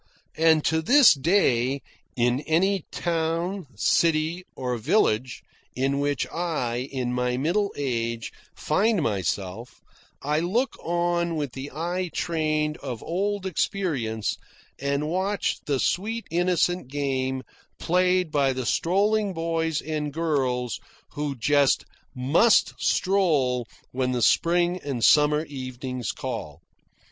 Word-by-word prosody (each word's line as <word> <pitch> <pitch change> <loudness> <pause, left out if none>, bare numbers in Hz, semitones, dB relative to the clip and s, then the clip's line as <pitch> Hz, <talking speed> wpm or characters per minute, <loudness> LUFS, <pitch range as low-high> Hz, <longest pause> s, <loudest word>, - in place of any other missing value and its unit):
(And 160 -1 +4
to 160 0 +2
this 265 - +7
day, 140 -5 +1 0.3
in 120 +1 +2
any 185 +3 +2
town, 170 +2 -2
city, 160 - +1
or 125 -1 -2
village, 120 - +1 0.3
in 135 +2 0
which 145 -1 0
I, 135 -7 -2
in 125 -2 -2
my 125 0 0
middle 185 +9 0
age, 115 -4 -2 0.2
find 195 +3 +1
myself, 100 - -3 0.4
I 150 +2 +1
look 220 +11 0
on 170 0 0
with 145 -4 -2
the 135 +2 -6
eye 175 +4 -3
trained 155 -2 0
of 125 -5 -6
old 195 +3 -2
experience, 140 - -1 0.4
and 140 +2 -1
watch 190 +5 -1
the 140 -3 +1
sweet 220 - -1
innocent 175 -2 +1
game 130 -2 -2 0.3
played 180 -1 +1
by 140 -3 +2
the 130 -1 -4
strolling 200 - +1
boys 165 -1 -1
and 150 -1 -3
girls 135 -7 -1 0.3
who 145 -1 -3
just 140 +3 +2 0.3
must 150 - +4
stroll 145 - +1 0.2
when 130 0 -1
the 120 -2 0
spring 175 +5 +3
and 130 -5 -1
summer 150 +1 +4
evenings 130 -4 -5
call.) - - -6
150 Hz, 115 wpm, -25 LUFS, 130-175 Hz, 0.4 s, this